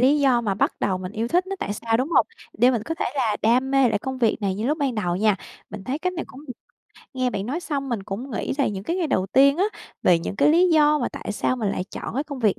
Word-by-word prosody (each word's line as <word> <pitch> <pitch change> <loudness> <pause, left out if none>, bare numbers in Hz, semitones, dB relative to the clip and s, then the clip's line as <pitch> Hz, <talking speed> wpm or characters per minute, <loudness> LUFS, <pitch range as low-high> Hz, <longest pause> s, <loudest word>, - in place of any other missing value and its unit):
lý 275 +4 +4
do 255 -4 +4
mà 205 -4 -1
bắt - - +1
đầu 185 -2 0
mình 185 +2 -6
yêu 225 +2 -2
thích 360 +5 +2
nó 390 0 -4
tại 205 - -3
sao, 225 +2 0
đúng 260 +5 -1
hông? - - +4 0.3
Để 250 +1 +6
mình 230 -4 -1
có 325 - -3
thể - - -2
là 225 -6 +1
đam 250 +4 +3
mê 270 -2 +4
lại 210 -2 +1
công 260 +2 -5
việc 230 -3 +2
này 195 -2 0
như 215 +4 -3
lúc 305 +3 0
ban 270 -4 0
đầu 180 -4 -1
nha. 210 0 +2 0.3
Mình 190 - -8
thấy 270 +4 -2
cách 365 +2 -1
này 340 - -4
cũng 280 +4 -13
được. 250 - -5 0.6
Nghe 255 -1 0
bạn 200 -1 -3
nói 305 +8 -2
xong 280 -5 -3
mình 230 -6 -2
cũng 225 +8 -6
nghĩ - - -2
lại 275 - +2
những 195 0 -6
cái 340 - -1
ngày 345 -4 0
đầu 185 -9 0
tiên 275 - +5
á, 380 - +2 0.4
về 175 -2 +5
những 175 - -5
cái 285 +1 +4
lý 350 +4 +5
do 300 -1 +4
mà - - -1
tại - - -6
sao 255 +4 0
mình 215 -4 -1
lại 185 - -2
chọn - - -6
cái 280 +3 -1
công 285 -3 -7
việc 215 -5 +1
255 Hz, 300 wpm, -23 LUFS, 210-285 Hz, 0.6 s, Để